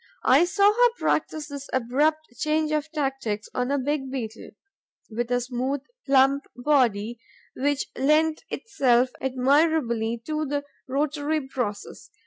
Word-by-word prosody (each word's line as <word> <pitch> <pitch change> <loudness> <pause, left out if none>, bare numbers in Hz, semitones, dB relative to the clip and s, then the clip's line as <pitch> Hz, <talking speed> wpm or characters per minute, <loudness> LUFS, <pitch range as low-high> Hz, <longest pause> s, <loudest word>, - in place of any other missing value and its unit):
I 280 +7 +6
saw 400 +3 +4
her 485 +1 +4
practise 310 -1 -1
this 280 -1 -8
abrupt 290 +6 +1
change 310 0 +1
of 305 0 -1
tactics 270 -8 -2
on 250 0 -1
a 285 - +1
big 275 0 -2
Beetle, 230 -4 -6 0.6
with 235 +2 -2
a 245 0 +1
smooth, 255 +3 -2 0.3
plump 275 +1 +4
body, 240 -5 +1 0.4
which 285 +1 0
lent 305 - +2
itself 255 - +1
admirably 260 -3 +1
to 310 0 -2
the 285 +1 -2 0.2
rotary 290 +1 -1
process. 235 -6 -5
275 Hz, 125 wpm, -25 LUFS, 250-305 Hz, 0.6 s, I